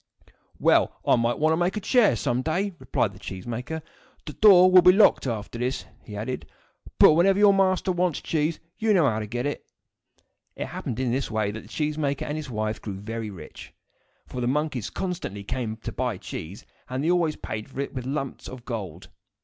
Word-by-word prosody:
"Well, - - +3
I - - +5
may 115 0 +1
want 155 +1 +2
to - - +1
make 175 +4 0
a - - 0
chair 215 - +3
some 120 +3 -1
day," 185 +8 -1
replied - - -1
the - - -14
cheese 95 -1 -7
maker. 125 +7 -5 0.4
"The 150 - -6
door 185 -2 +7
will 185 0 +9
be 180 +1 +8
locked 195 -7 +4
after 115 0 -4
this," 125 +2 -2 0.2
he 105 - -9
added; 120 +5 -4 0.5
"but - - +8
whenever 190 +4 +4
your 205 -1 +6
master 190 -1 +2
wants 175 -3 0
cheese, 155 0 -1 0.2
you 220 -2 +3
know 165 -6 +4
how 110 -3 0
to 105 - -5
get 120 +4 -3
it." 145 - -3 0.9
It - - -4
happened, 115 - -5
in 130 -2 0
this 130 +2 -1
way, 110 -2 -1
that 110 +1 -7
the - - -16
cheese 150 0 -2
maker 140 -2 -1
and 150 - -3
his 155 -3 -5
wife 110 -2 -3
grew 100 -3 -6
very 110 +1 -5
rich; 85 -6 -11 0.5
for 125 - -6
the 120 - 0
monkeys 145 -3 -1
constantly 175 - -4
came 110 +1 -3
to 110 - -6
buy 125 -5 -2
cheese, 90 +2 -8 0.2
and 130 +2 -2
they 165 - +2
always 170 -3 +1
paid 110 0 -6
for 135 - -9
it 140 - -3
with 130 -3 -5
heavy 135 +3 -2
lumps 135 -3 -5
of 125 -2 -10
gold. 95 - -6
130 Hz, 215 wpm, -25 LUFS, 115-170 Hz, 0.9 s, will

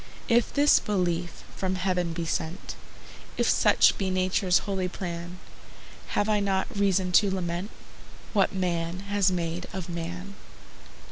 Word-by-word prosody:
If 235 0 +3
this 290 +1 +5
belief 175 -4 -2
from 190 -1 -1
heaven 180 -2 0
be 165 0 -3
sent, 160 +2 -3 0.6
If - - +1
such - - +4
be 195 -2 0
Nature's 185 0 +2
holy 190 -2 -1
plan, 175 -1 -6 0.8
Have 205 - +2
I 210 -1 +2
not 195 -1 +1
reason 195 -2 +1
to 200 +3 +5
lament 180 0 -3 0.6
What 200 -3 +3
man 175 -1 -2
has 200 -2 +3
made 170 -1 -3
of 185 -2 -5
man? 175 +3 -5
185 Hz, 135 wpm, -27 LUFS, 175-195 Hz, 0.8 s, this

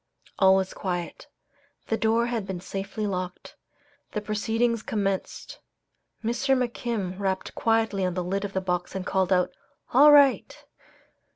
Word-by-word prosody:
All 190 -1 +6
was 190 -1 -1
quiet. 175 -3 -4 0.6
The 225 - 0
door 225 +1 +2
had 235 -4 -3
been 190 -2 -4
safely 195 +3 -5
locked. 185 -2 -5 0.6
The 210 - -1
proceedings 225 +2 0
commenced. 195 -3 -3 0.6
Mr. 260 +4 +1
McKim 230 -6 -3
rapped 190 -1 -2
quietly 225 -3 +1
on 180 -1 -1
the 180 - -1
lid 195 +3 -2
of 200 -1 -5
the 190 - -1
box 180 -1 -2
and 190 -1 -4
called 190 -1 0
out, 180 -1 +3 0.4
"All 290 +4 +8
right!" 285 -3 +4
200 Hz, 145 wpm, -26 LUFS, 190-225 Hz, 0.6 s, All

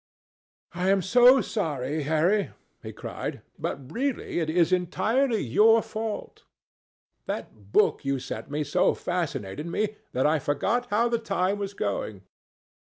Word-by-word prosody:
"I 180 +2 0
am 195 -1 +3
so 245 +6 +6
sorry, 150 - -2
Harry," 180 +6 +2 0.3
he - - -7
cried, - - -6 0.2
"but 135 -2 -4
really 260 -7 -2
it 160 -2 -1
is 170 +1 +3
entirely 215 +7 +1
your 220 - +5
fault. 220 -1 -5 0.8
That 105 -2 -6
book - - +3
you 135 0 0
sent 135 +1 -6
me 150 +1 -1
so 180 +4 +2
fascinated 150 - -3
me 210 +4 -2 0.2
that 130 - +1
I 155 +1 +3
forgot 200 - 0
how 230 +1 +2
the 235 -1 0
time 195 -2 -1
was 200 0 -4
going." 100 - -3
180 Hz, 140 wpm, -26 LUFS, 145-215 Hz, 0.8 s, so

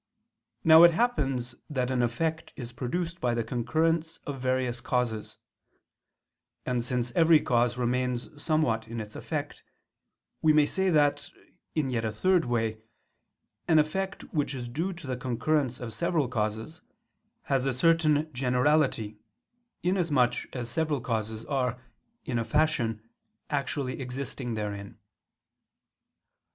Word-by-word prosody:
Now 160 0 +8
it 170 -1 +8
happens 135 - 0 0.2
that 130 -3 -1
an 125 -1 +1
effect 160 +7 -1
is 120 -2 -7
produced 170 +9 -3
by 120 -1 +1
the 115 - 0
concurrence 160 +7 0
of 135 -3 -5
various 130 -2 0
causes; 115 -3 -2 1.3
and 125 -2 0
since 125 -1 -1
every 165 +2 +5
cause 120 -2 +1
remains 125 +3 -1
somewhat 130 -9 +1
in 115 +1 -5
its 105 -1 -7
effect, - - -4 0.8
we 155 -1 +5
may 150 -1 +5
say 190 +5 0
that, 145 -3 +2 0.5
in 145 -5 0
yet 115 -2 -1
a 110 - -1
third 180 - +2
way, 115 -2 -1 0.9
an 160 - +5
effect 190 +6 0
which 145 -3 0
is 125 -2 -5
due 160 +10 -2
to 170 -4 -10
the 130 -1 -2
concurrence 130 +1 0
of 115 -3 -6
several 145 +6 0
causes, 110 +5 -3 0.6
has 135 -1 0
a - - +2
certain 155 +2 +2
generality, 125 -4 +1 0.6
inasmuch 170 -9 +1
as 120 -2 -3
several 155 +3 0
causes 110 -2 -3
are, 125 -3 -1 0.5
in 120 -2 -1
a - - 0
fashion, 120 -7 0 0.4
actually 140 -2 -2
existing 125 -1 -4
therein. 100 -2 -5
130 Hz, 130 wpm, -28 LUFS, 120-155 Hz, 1.3 s, Now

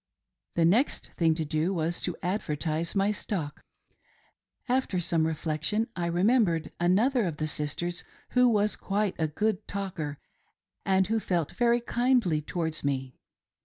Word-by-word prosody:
The 170 - +3
next 225 - +2
thing 165 -2 +3
to 160 -1 -2
do 155 +5 0
was 165 +1 -1
to 180 - -3
advertise 165 -3 -1
my 200 +1 +3
stock. 170 -8 -4 1.1
After 250 -7 +1
some 165 -2 +1
reflectien, 160 +7 -1
I 175 -1 -1
remembered 175 -2 +2
another 215 +8 +3
of 165 -4 -3
the 155 - -1
sisters, 160 +3 -3 0.3
who 250 0 +5
was 210 -2 +2
quite 205 -1 -1
a 160 - +2
good 210 +6 -1
talker, 185 -8 -4 0.7
and 190 0 +4
who 225 +3 0
felt 175 -7 -1
very 240 0 +2
kindly 240 -10 +2
towards 160 0 -2
me. 135 -2 -1
175 Hz, 140 wpm, -28 LUFS, 160-210 Hz, 1.1 s, who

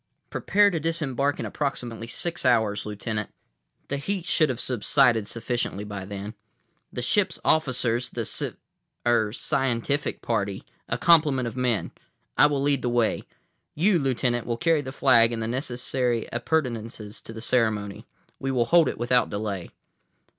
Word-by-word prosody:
"Prepare 205 +1 +3
to 165 - -1
disembark 145 -4 -1
in - - -3
approximately 120 -5 -3
six 170 +8 -3
hours, 110 -5 +2
Lieutenant. 105 0 -4 0.6
The 140 - -1
heat 185 +5 -3
should 155 -5 +3
have 125 - -2
subsided 120 -2 +2
sufficiently 115 -3 -3
by 100 -2 -6
then. 100 +2 -6 0.6
The 125 - -4
ship's 190 - +1
officers, 125 -5 +1
the - - -4
civ—er—scientific 120 +4 -2
party, 100 -4 -1 0.3
a - - 0
complement 150 -7 +4
of 115 - -6
men. 125 -4 0 0.4
I 150 - +6
will 140 -2 -1
lead 140 -2 +2
the 125 - 0
way. 120 -2 +1 0.5
You, 180 +3 +3
Lieutenant, 125 -3 0
will 120 -1 -1
carry 165 +1 +2
the 130 -2 -6
flag 120 -4 +4
and 115 -1 -3
the - - -2
necessary 125 -1 -1
appurtenances 115 -5 -2
to - - -10
the 115 - -8
ceremony. 110 -4 0 0.3
We 135 - -2
will 125 -3 +2
hold 165 +2 +5
it - - -5
without 120 +1 +2
delay." 100 -3 -4
125 Hz, 145 wpm, -25 LUFS, 115-140 Hz, 0.6 s, I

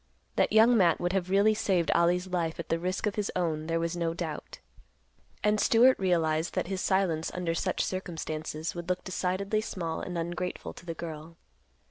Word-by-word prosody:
That - - +2
Young 225 +3 +6
Matt 180 -6 +4
would 175 +1 -1
have 185 -2 0
really 200 +3 +4
saved 185 -5 +1
Ollie's 175 +2 +3
life 170 -3 -2
at 170 - -6
the 165 - +1
risk 185 +4 -2
of 210 - 0
his 210 -2 -2
own 160 -4 -1
there 165 0 0
was 170 +1 -1
no 165 -1 -1
doubt. 165 -3 -5 0.9
And 210 0 +3
Stewart 245 +5 +5
realized 165 -3 +1
that - - 0
his 190 +1 -3
silence 185 -5 +1
under 175 -2 -1
such 185 +2 0
circumstances 160 -4 -4
would 175 0 -7
look 180 0 -1
decidedly 195 +3 -1
small 170 -7 -4
and 180 -1 -4
ungrateful 175 +2 -4
to 180 - -14
the 165 - -4
girl. 160 0 -8
175 Hz, 185 wpm, -29 LUFS, 165-190 Hz, 0.9 s, Young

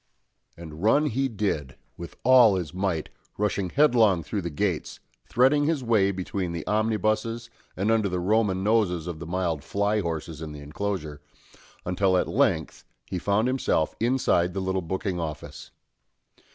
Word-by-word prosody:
And 80 -2 -10
run 140 +9 +4
he 135 -1 0
did, 100 - -2 0.2
with 85 -3 -9
all 125 -5 +6
his 85 -6 -4
might, 90 -4 -2 0.3
rushing 100 -2 -1
headlong 115 - +4
through 100 +7 -3
the 85 - -4
gates, 85 +2 -2 0.3
threading 135 +4 +3
his 150 -4 0
way 110 -5 +3
between 95 -2 -3
the 85 -2 -5
omnibuses 110 +2 0 0.3
and 100 +4 +1
under 110 -3 +2
the 90 0 -2
Roman 95 0 +1
noses 100 -6 +1
of 85 -3 -6
the 85 - -7
mild 85 -4 -2
fly 100 +1 0
horses 80 -3 -4
in 75 -1 -6
the 75 - -9
enclosure, 75 0 -4 0.6
until 95 +1 +2
at - - +1
length - - 0 0.3
he 90 - -2
found 100 +6 +1
himself 130 - 0
inside 110 -8 +1
the - - -1
little 95 0 -1
booking 95 +1 -3
office. 80 -2 -6
95 Hz, 155 wpm, -26 LUFS, 85-110 Hz, 0.6 s, all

